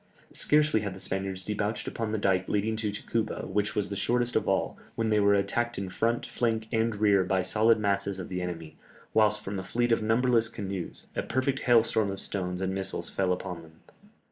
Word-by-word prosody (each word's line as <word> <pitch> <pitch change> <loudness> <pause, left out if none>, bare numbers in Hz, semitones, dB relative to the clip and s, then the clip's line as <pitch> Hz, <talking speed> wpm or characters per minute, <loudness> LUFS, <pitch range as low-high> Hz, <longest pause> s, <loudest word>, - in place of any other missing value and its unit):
Scarcely 150 -4 +3
had 100 -3 -4
the - - -9
Spaniards 95 0 -3
debouched 105 +2 -2
upon 115 -2 -3
the 110 - 0
dike 95 -2 +1
leading 105 +2 0
to 110 -2 -1
Tacuba, 110 +1 -2
which 105 +2 -1
was 105 - 0
the 100 - -3
shortest 120 +4 0
of 110 - +1
all, 95 - +1 0.2
when 115 -1 0
they 105 -1 +3
were 100 0 +5
attacked 115 +4 0
in 95 -1 -3
front, 115 +5 0
flank, 110 -2 -1
and 115 -1 +1
rear 100 -2 +4
by 95 0 +1
solid 110 +4 +4
masses 100 -1 0
of 95 - -6
the 90 -1 -3
enemy, 85 -3 -6 0.4
whilst 105 -1 +3
from 100 -1 -4
a - - -5
fleet 120 +5 0
of 115 - +3
numberless 115 +1 +3
canoes, 95 -4 -6
a - - 0
perfect 130 +2 0
hailstorm 115 -3 +3
of 95 0 -4
stones 90 -2 -3
and 95 0 -1
missiles 95 0 -4
fell 95 -2 +1
upon 90 -1 -3
them. 80 -1 -15
105 Hz, 205 wpm, -28 LUFS, 95-115 Hz, 0.4 s, were